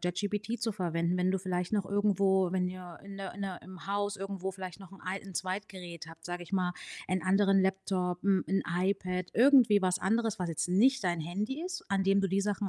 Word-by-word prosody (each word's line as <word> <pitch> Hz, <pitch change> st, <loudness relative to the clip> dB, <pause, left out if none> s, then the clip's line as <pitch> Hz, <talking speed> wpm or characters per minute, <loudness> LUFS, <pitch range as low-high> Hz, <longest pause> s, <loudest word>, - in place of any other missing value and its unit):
ChatGPT 205 Hz, +5 st, -2 dB
zu 225 Hz, -1 st, 0 dB
verwenden, 170 Hz, -2 st, 0 dB
wenn 180 Hz, 0 st, +2 dB
du 190 Hz, -, +1 dB
vielleicht 180 Hz, 0 st, -2 dB
noch 205 Hz, -3 st, +1 dB
irgendwo 195 Hz, -2 st, +2 dB
wenn 185 Hz, 0 st, +1 dB
ihr 180 Hz, -2 st, -7 dB
in 200 Hz, 0 st, -8 dB
'ner 195 Hz, -1 st, -5 dB
in 205 Hz, -, -9 dB
'ner 190 Hz, -2 st, -4 dB
im 185 Hz, 0 st, -11 dB
Haus 205 Hz, +1 st, -1 dB
irgendwo 195 Hz, -1 st, -4 dB
vielleicht 185 Hz, 0 st, -8 dB
noch 190 Hz, -2 st, -12 dB
'n 195 Hz, -, -13 dB
alten 190 Hz, 0 st, -5 dB
Zweitgerät 185 Hz, -2 st, -5 dB
habt, 165 Hz, 0 st, -14 dB
sage 175 Hz, 0 st, -4 dB
ich 175 Hz, -, -13 dB
mal, 180 Hz, -2 st, +1 dB, 0.3 s
'n 185 Hz, 0 st, 0 dB
anderen 195 Hz, +1 st, +4 dB
Laptop, 190 Hz, -2 st, 0 dB
hm, 195 Hz, -1 st, +3 dB
'n 195 Hz, +1 st, +2 dB
iPad, 185 Hz, -1 st, -1 dB
irgendwie 245 Hz, -4 st, +6 dB
was 185 Hz, 0 st, +2 dB
anderes, 225 Hz, +2 st, +1 dB
was 180 Hz, -, -1 dB
jetzt 165 Hz, +2 st, -2 dB
nicht 240 Hz, +7 st, +4 dB
dein 175 Hz, -2 st, +1 dB
Handy 210 Hz, -, -3 dB
ist, 360 Hz, -1 st, -5 dB
an 195 Hz, -1 st, +2 dB
dem 195 Hz, +1 st, +4 dB
du 195 Hz, -, +1 dB
die 195 Hz, +2 st, +2 dB
Sachen 205 Hz, 0 st, -1 dB
190 Hz, 220 wpm, -31 LUFS, 180-200 Hz, 0.3 s, irgendwie